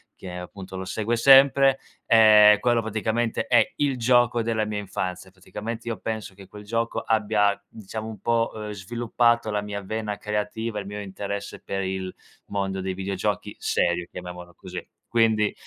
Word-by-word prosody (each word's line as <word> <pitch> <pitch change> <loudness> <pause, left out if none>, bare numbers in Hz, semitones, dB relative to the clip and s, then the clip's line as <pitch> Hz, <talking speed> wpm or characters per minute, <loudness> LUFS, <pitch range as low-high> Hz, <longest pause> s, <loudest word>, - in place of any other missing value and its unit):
che 90 -1 -8
appunto 95 +1 -9
lo 95 0 -5
segue 110 +4 -1
sempre. 135 +1 +6 0.3
Eh 105 -2 +7
quello 120 -1 +2
praticamente 110 +1 -1
è 120 -3 +3
il 145 -2 +1
gioco 120 0 +3
della 110 -1 0
mia 105 -1 -3
infanzia. 95 -2 -5
Praticamente 110 +5 -7
io 115 -2 -2
penso 110 -3 -4
che 95 0 -14
quel 105 +2 -11
gioco 115 +2 -1
abbia, 105 -2 +1
diciamo, 110 +1 -7
un 110 -2 -8
po' 115 -1 -1
eh - - -5
sviluppato 120 +3 0
la 105 0 0
mia 100 0 -5
vena 105 +1 -4
creativa, 105 +1 -3
il 100 - -7
mio 105 +1 -6
interesse 100 0 -6
per 95 0 -3
il 95 -1 -4 0.3
mondo 95 -1 -2
dei 95 0 -3
videogiochi 95 +1 -3
serio, 85 0 0
chiamiamolo 90 -1 -9
così, - - -8 0.2
quindi. 110 -2 +2
105 Hz, 160 wpm, -25 LUFS, 95-115 Hz, 0.3 s, Eh